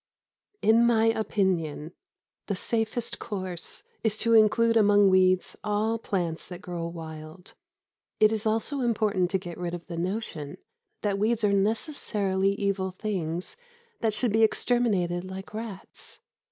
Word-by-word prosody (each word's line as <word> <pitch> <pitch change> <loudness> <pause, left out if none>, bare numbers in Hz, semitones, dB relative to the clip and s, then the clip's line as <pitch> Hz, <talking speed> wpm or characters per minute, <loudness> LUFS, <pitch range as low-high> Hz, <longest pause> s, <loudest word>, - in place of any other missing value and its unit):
In 225 +2 +5
my 225 -2 +4
opinion, 185 -8 0 0.5
the 200 - -1
safest 225 +3 -2
course 185 -6 -5 0.2
is 220 -1 +1
to 230 +1 +2
include 230 +1 +5
among 205 -2 +5
weeds 185 -1 +3
all 215 +2 0
plants 175 -7 -2
that 180 -1 -8
grow 175 -2 -5
wild. 160 +1 -9 0.7
It 215 0 +6
is 220 0 -1
also 225 +6 0
important 215 -7 +1
to 190 - +1
get 175 -2 -8
rid 175 -1 -3
of 175 - -9
the 170 -2 -6
notion 175 -5 -4 0.5
that 200 -2 0
weeds 225 +2 +1
are 205 -1 +3
necessarily 200 -3 0
evil 200 -1 -1
things 185 - -4 0.4
that 225 -2 +1
should 230 -1 0
be 220 - +3
exterminated 210 -7 +2
like 190 +2 -8
rats. 215 -3 -8
200 Hz, 140 wpm, -27 LUFS, 180-220 Hz, 0.7 s, It